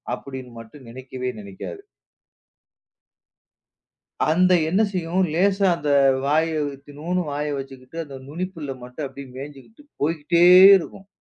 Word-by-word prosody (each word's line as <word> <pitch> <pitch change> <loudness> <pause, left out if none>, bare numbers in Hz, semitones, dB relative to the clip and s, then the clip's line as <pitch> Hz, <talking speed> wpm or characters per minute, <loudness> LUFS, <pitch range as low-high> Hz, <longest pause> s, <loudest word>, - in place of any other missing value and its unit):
அப்படின்னு 130 -2 -9
மட்டும் 115 +3 -13
நினைக்கவே 130 +1 -6
நினைக்காது. 100 - -9 2.5
அந்த 185 +3 +3 0.2
என்ன 190 +6 +2
செய்யும், 180 0 0
லேசா 195 +3 +2
அந்த 150 -3 -4 0.4
வாய 155 +3 +2 0.3
இத்துணுன்னு 150 +6 -4
வாய 150 +1 -3
வச்சுக்கிட்டு, 135 +2 -10
அந்த 135 -2 -10
நுனிப்புல்ல 165 -2 -5
மட்டும் 125 +4 -6
அப்டி 135 +1 -10
மேய்ஞ்சுக்கிட்டு 145 - -11 0.2
போய்க்கிட்டே 165 +3 +2 0.3
இருக்கும். 190 +2 -9
150 Hz, 105 wpm, -22 LUFS, 135-175 Hz, 2.5 s, அந்த